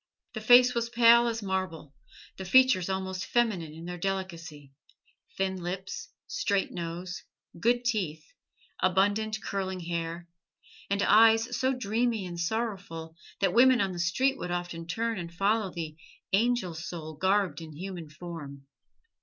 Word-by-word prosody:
The 220 - -5
face 245 +3 +7
was 235 0 -1
pale 235 0 +6
as 225 -2 -2
marble: 185 -6 -3 0.4
the 190 - -7
features 195 -3 +4
almost 190 -1 -3
feminine 210 -10 0
in 165 +1 -9
their 175 0 -6
delicacy: 165 -7 -5 0.6
thin 190 -1 -1
lips, 185 +2 -5 0.2
straight 210 - -1
nose, 175 +2 -5 0.4
good 240 +4 +2
teeth, 175 -10 -1 0.5
abundant, 205 +4 +1
curling 190 -2 -3
hair, 170 0 -4 0.6
and 200 0 +1
eyes 225 +2 +5
so 260 0 +1
dreamy 230 -2 0
and 175 -1 -6
sorrowful 180 -5 -3 0.3
that 195 - +2
women 255 +1 +6
on 195 -3 +1
the 175 - -6
street 255 +11 +1
would 180 - -4
often 175 -1 -4
turn 225 +4 -2
and 170 -1 -6
follow 205 +2 +1
the 160 -3 -6 0.4
"angel 230 -3 +2
soul 165 -1 -6
garbed 190 +2 +1
in 160 -1 -9
human 175 -2 -7
form." 150 -4 -9
190 Hz, 140 wpm, -29 LUFS, 170-225 Hz, 0.6 s, face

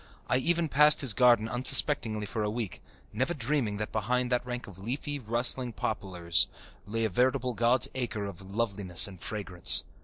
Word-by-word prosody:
I 125 - +1
even 170 +4 +1
passed 150 +1 +4
his 130 -7 +3
garden 120 -2 +3
unsuspectingly 120 -3 +3
for 105 +3 -4
a 105 - -1
week, 110 -3 -5 0.3
never 130 +10 -1
dreaming 125 -5 -1
that 105 +1 -5
behind 125 +3 -1
that 125 0 0
rank 125 0 -6
of 95 -2 -13
leafy, 140 +7 -5
rustling 120 +1 -1
poplars 90 -6 0 0.4
lay 115 +2 -2
a - - -1
veritable 125 +4 0
"God's 120 +4 +2
acre" 120 -5 -4
of 100 -2 -9
loveliness 100 -3 +1
and 95 -4 -13
fragrance. 95 -5 +1
115 Hz, 165 wpm, -28 LUFS, 105-125 Hz, 0.4 s, passed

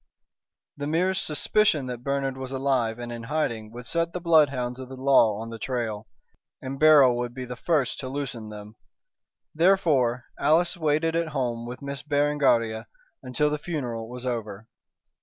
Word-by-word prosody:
The 145 0 -4
merest 185 +5 +1
suspicion 155 -1 +2
that 125 -1 -6
Bernard 140 -1 -1
was 130 0 -6
alive 130 -4 0
and 120 0 -6
in 120 0 -6
hiding 115 -8 -2
would 120 +1 -9
set 170 +5 -1
the 180 - -3
bloodhounds 140 -7 +2
of 130 -1 -8
the 130 - -8
law 130 -6 +4
on 115 +1 -6
the 115 - -7
trail, 115 -5 -3 0.5
and 135 +1 -6
Beryl 145 -5 +7
would 120 0 -4
be 130 -1 -5
the 125 0 -6
first 140 -3 0
to 130 - -5
loosen 130 -5 -5
them. 105 +1 -10 0.8
Therefore, 150 -9 +2
Alice 170 +4 +3
waited 160 0 +1
at 170 0 0
home 120 -2 -2
with 125 +3 -8
Miss 140 -1 -5
Berengaria 145 -6 +1 0.3
until 150 +4 0
the 150 - -2
funeral 125 -9 -4
was 125 +1 -7
over. 110 -3 -4
130 Hz, 165 wpm, -26 LUFS, 120-150 Hz, 0.8 s, Beryl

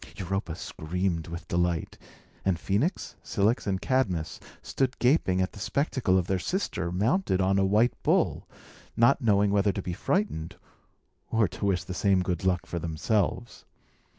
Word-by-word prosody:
Europa 95 -3 -3
screamed 85 +1 -3
with 85 0 -7
delight; 85 -2 -1 0.5
and 95 -3 +1
Phœnix, 105 - -1
Cilix, 105 +4 0
and 95 -1 0
Cadmus 95 -12 -1 0.2
stood 130 -1 -1
gaping 125 - +2
at 95 - -3
the - - -12
spectacle 125 - +1
of 90 - +1
their 95 +1 0
sister 95 - -2
mounted 105 - +1
on 95 +1 +2
a 95 - +3
white 110 +5 +3
bull, - - +1 0.5
not 120 +4 +4
knowing 105 -3 +3
whether 100 0 +3
to 100 - -4
be 90 - -3
frightened 85 - -1 0.7
or 110 -2 +2
to 95 +4 -5
wish 95 -3 +1
the 90 - -6
same 95 0 +2
good 90 -2 -2
luck 90 -2 +1
for 85 - -4
themselves. 100 +8 -1
95 Hz, 155 wpm, -27 LUFS, 90-110 Hz, 0.7 s, not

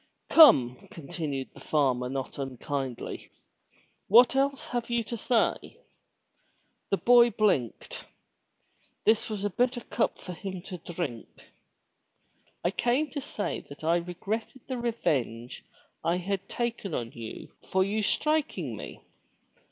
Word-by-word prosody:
Come,'* 195 - +7
continued 145 -6 -5
the - - -13
farmer 130 -5 +1
not 135 +1 -4
unkindly, 135 -1 -4 0.8
what 240 +5 +7
else 275 0 0
have 240 -1 -2
you 235 -1 +1
to 235 - -5
say?'* 235 - 0 1.1
The 195 - +2
boy 240 +1 +6
blinked. 195 - 0 1.0
This 220 +1 +3
was 210 -2 -4
a 205 - +1
bitter 245 +3 +1
cup 230 - -1
for 180 - -8
him 185 0 -6
to 180 -2 -7
drink. 160 -9 -6 1.1
*'I 175 - +2
came 245 +8 +1
to 285 - -4
say 210 -5 -3
that 145 +2 -11
I 165 +2 +3
regretted 200 +8 -4
the 255 -2 -3
revenge 130 - -2 0.4
I 170 +2 +2
had 195 +1 -3
taken 235 -7 -2
on 115 -1 -3
you 115 -2 -8 0.2
for 190 0 +2
you 205 +3 -1
striking 210 - 0
me. - - -9
190 Hz, 130 wpm, -28 LUFS, 140-235 Hz, 1.1 s, Come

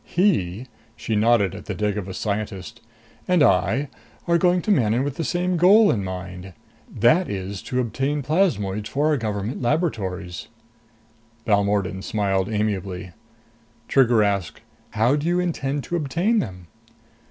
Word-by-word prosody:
He" 125 - 0 0.3
she 110 - -3
nodded 105 -3 +3
at 100 - -9
the 105 - -4
Devagas 100 -2 -2
scientist 105 +2 -4 0.5
"and 180 -4 +4
I 125 +6 +2 0.4
are 170 0 +3
going 180 -1 +2
to 215 - 0
Manon 120 - +2
with 140 -1 -3
the 165 - -3
same 180 +2 0
goal 200 +5 +6
in 100 -4 -1
mind. 90 0 -7 0.4
That 125 - +3
is 95 0 -5
to 125 -2 -3
obtain 135 +4 -1
plasmoids 110 - 0
for 145 +3 +1
our 150 - +2
government 105 0 -3
laboratories." 100 - -2 1.0
Balmordan 100 -2 +1
smiled 100 -2 0
amiably. 100 -4 -2 0.8
Trigger 120 -5 +4
asked. 100 -5 -2 0.3
"How 115 +5 +3
do 150 +2 -2
you 175 +1 +2
intend 145 -5 -2
to 175 - -4
obtain 175 - +1
them?" 90 - -5
110 Hz, 140 wpm, -23 LUFS, 100-150 Hz, 1.0 s, goal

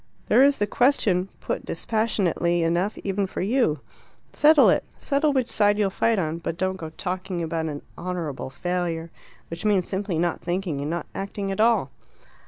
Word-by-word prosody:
There - - +6
is 280 +1 +5
the 205 - +1
question 205 -6 +2
put - - -3
dispassionately 180 -6 0
enough 175 +5 0
even 195 0 -1
for - - -5
you. 195 - +1 0.5
Settle 300 -1 +6
it. - - +1
Settle 290 +1 +1
which 260 -4 +1
side 205 -1 +2
you'll 200 -2 +1
fight 225 +3 +1
on. 165 -2 -1
But 165 0 -4
don't 185 +1 -1
go 160 -3 -6
talking 180 +1 -4
about 160 0 -2
an 145 -2 -5
'honourable 170 -7 -4
failure,' 170 +1 -3 0.4
which 165 - -6
means 200 -4 +2
simply 195 -3 -2
not 170 +1 0
thinking 175 -5 -2
and 145 - -3
not 170 -1 -3
acting 195 0 -4
at 195 - -1
all." 220 - +3
185 Hz, 175 wpm, -24 LUFS, 170-210 Hz, 0.5 s, There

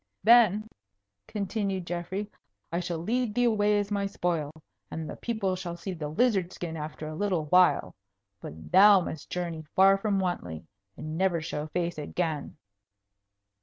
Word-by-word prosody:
"Then," 215 -2 +5 0.6
continued 200 -3 -2
Geoffrey, 175 +4 -4 0.4
"I 170 - 0
shall 175 -1 -3
lead 225 +6 -1
thee 245 - +2
away 210 -3 +3
as 205 0 -2
my 200 -1 0
spoil, 170 -6 -2 0.4
and 160 -1 -5
the - - -6
people 220 -6 -2
shall 175 -2 -6
see 185 +3 -5
the 160 -4 -5
lizard 195 +1 +1
skin 170 -3 -6
after 155 0 -6
a 155 - -6
little 180 -2 -1
while. 180 +4 +4 0.5
But 80 - -10
thou 195 +1 +8
must 160 -3 -6
journey 170 -3 -4
far 195 +1 +6
from 205 -1 0
Wantley, 90 - -3 0.3
and 155 +2 -5
never 190 -3 +2
show 155 -1 -4
face 170 0 -2
again." 155 0 -3
180 Hz, 155 wpm, -28 LUFS, 160-205 Hz, 0.6 s, thou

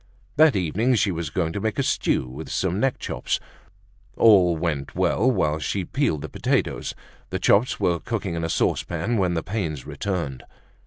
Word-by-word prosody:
That 155 -3 +5
evening 100 +8 +1
she 105 -3 +2
was 85 -3 -3
going 80 -1 -1
to 100 - -3
make 110 0 -1
a - - +1
stew - - 0
with 70 +5 -8
some 95 +1 -1
neck 135 +2 +1
chops. - - -2 0.8
All 90 -7 +6
went 75 -4 -3
well 125 - +2
while 75 -11 +1
she 95 +4 -2
peeled 120 - -1
the - - -4
potatoes. - - -1 0.3
The - - -2
chops 110 +6 +3
were 85 -1 +1
cooking 105 -5 -3
in 85 0 -3
a 80 - -1
saucepan 85 +8 0
when 90 -2 +1
the 80 - -1
pains 85 - -3
returned. 85 -10 -3
90 Hz, 175 wpm, -24 LUFS, 80-110 Hz, 0.8 s, All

